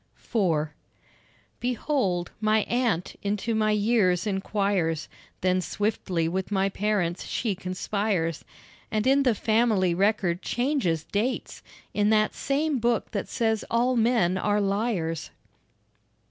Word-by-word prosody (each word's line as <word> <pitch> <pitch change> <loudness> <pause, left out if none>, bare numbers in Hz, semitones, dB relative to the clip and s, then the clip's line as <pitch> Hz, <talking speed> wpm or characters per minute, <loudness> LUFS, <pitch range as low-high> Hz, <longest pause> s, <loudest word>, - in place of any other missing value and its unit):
IV 165 -9 0 0.9
Behold, 240 - -1
my 215 0 +3
aunt 235 -8 0
into 205 +3 -1
my 215 -1 +2
years 210 -4 +2
inquires, 195 -5 0 0.3
Then 185 0 +2
swiftly 185 -4 -1
with 185 +2 -2
my 195 -1 +2
parents 195 -4 -1
she 225 -5 -1
conspires, 185 -2 -2 0.5
And 215 -1 -1
in 270 +2 +4
the 250 -5 +3
family 215 -5 +2
record 190 -2 +1
changes 240 - 0
dates 225 +9 -2 0.3
In 210 0 +2
that 215 -1 +3
same 285 0 0
book 235 0 0
that 200 - -3
says 220 -3 0
all 245 +2 +2
men 225 -6 +2
are 210 +1 +1
liars. 195 -5 -1
210 Hz, 120 wpm, -26 LUFS, 185-230 Hz, 0.9 s, in